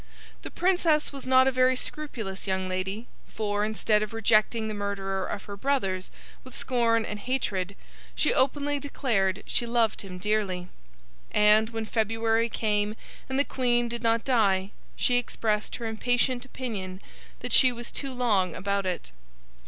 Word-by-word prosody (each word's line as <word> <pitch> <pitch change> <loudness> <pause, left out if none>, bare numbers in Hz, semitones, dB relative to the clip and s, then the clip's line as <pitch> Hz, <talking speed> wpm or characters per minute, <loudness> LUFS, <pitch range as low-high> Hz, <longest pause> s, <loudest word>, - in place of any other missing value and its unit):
The - - -7
Princess 340 -5 +2
was 275 -2 -7
not 260 0 +6
a - - +4
very 255 0 +3
scrupulous 230 -10 -6
young 190 -1 0
lady, 190 +4 -3 0.2
for, 205 -1 -1
instead 215 0 +1
of 215 +1 -3
rejecting 220 0 +2
the 215 - -3
murderer 195 -2 -2
of 200 - -5
her 200 - -7
brothers 195 -7 -1 0.3
with 255 -1 -12
scorn 230 -3 +1
and 210 - -5
hatred, 200 -6 -2 0.4
she - - +2
openly 285 +2 +1
declared 215 -9 0
she 235 - -1
loved 230 -2 +1
him 185 -2 -8
dearly; 185 -2 -1 0.6
and, 210 +1 +5
when 225 -1 -4
February 225 +1 +1
came 210 -1 0 0.3
and 265 - -1
the 280 - +3
Queen 240 -2 +1
did 235 0 -5
not 230 -1 +1
die, 200 -6 +2 0.2
she 245 - +2
expressed 215 -3 -1
her 235 - -5
impatient 245 +3 0
opinion 205 -8 -5 0.4
that 245 - -3
she 255 - +7
was 240 -1 -7
too 275 -1 -3
long 210 -9 +1
about 200 0 -1
it. 175 - -4
220 Hz, 155 wpm, -27 LUFS, 200-250 Hz, 0.6 s, she